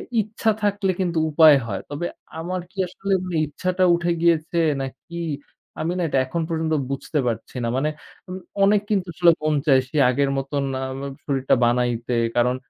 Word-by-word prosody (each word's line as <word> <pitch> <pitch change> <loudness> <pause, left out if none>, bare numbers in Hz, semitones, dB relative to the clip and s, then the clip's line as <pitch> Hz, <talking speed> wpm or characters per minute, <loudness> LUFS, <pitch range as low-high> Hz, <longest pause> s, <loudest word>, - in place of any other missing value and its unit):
ই - - +4
ইচ্ছা 215 +1 0
থাকলে 205 -1 +1
কিন্তু 175 -3 0
উপায় 155 -1 +7
হয়। 100 -4 -4
তবে 145 +4 -4 0.3
আমার 180 +2 -3
কি - - -27
আসলে 195 +2 -3 0.3
ইচ্ছাটা 185 +5 -1
উঠে 170 0 -1
গিয়েছে? 170 0 +2 0.2
না 135 - -1 0.2
কী? 170 0 -6 0.6
আমি 160 +2 -1
না - - -1
এটা 135 - 0
এখন 150 +6 -3
পর্যন্ত 160 -1 -1 0.2
বুঝতে 140 +2 -2
পারছি 115 +1 -4
না। - - 0
মানে 150 +3 +1 0.4
উম 185 - -5 0.3
অনেক 200 +1 +4
কিন্তু 195 -4 0
আসলে 170 +1 +5
মন 155 0 +2
চায় 135 -4 +5
সেই 150 +1 +1
আগের 140 +2 +1
মতন 140 +1 -2 0.2
আম 130 0 -6
আম 140 - -7
শরীরটা 135 -2 +1
বানাইতে, 120 0 0 0.2
কারণ 125 +1 +3
155 Hz, 180 wpm, -23 LUFS, 135-180 Hz, 0.6 s, উপায়